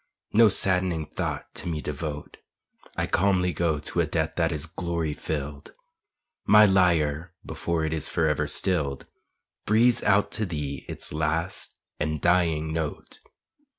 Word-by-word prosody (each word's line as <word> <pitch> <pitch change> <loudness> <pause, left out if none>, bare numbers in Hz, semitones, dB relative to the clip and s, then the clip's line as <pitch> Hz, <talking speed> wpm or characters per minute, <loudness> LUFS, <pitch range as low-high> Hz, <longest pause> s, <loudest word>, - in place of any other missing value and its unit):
No 115 0 +7
saddening 90 -4 +1
thought - - -5
to 90 - -5
me 80 -3 -2
devote; 75 0 -5 0.6
I - - +1
calmly 90 -1 +1
go 80 0 0
to 75 +4 -3
a 80 - 0
death 80 0 -1
that 85 -1 +1
is 75 -1 -2
glory 85 -2 -3
filled, 75 -1 -5 0.7
My 105 +1 +8
lyre 85 -3 +2
before 85 -2 -2
it 80 - -2
is 80 -2 -2
forever 80 -3 +1
stilled 75 -8 0 0.6
Breathes 120 +3 +4
out 100 0 +2
to 110 -3 -2
thee 75 -5 -5
its - - 0
last 80 +4 -2 0.2
and 75 0 -1
dying 80 -2 +1
note. 80 -3 -5
80 Hz, 140 wpm, -26 LUFS, 75-90 Hz, 0.7 s, My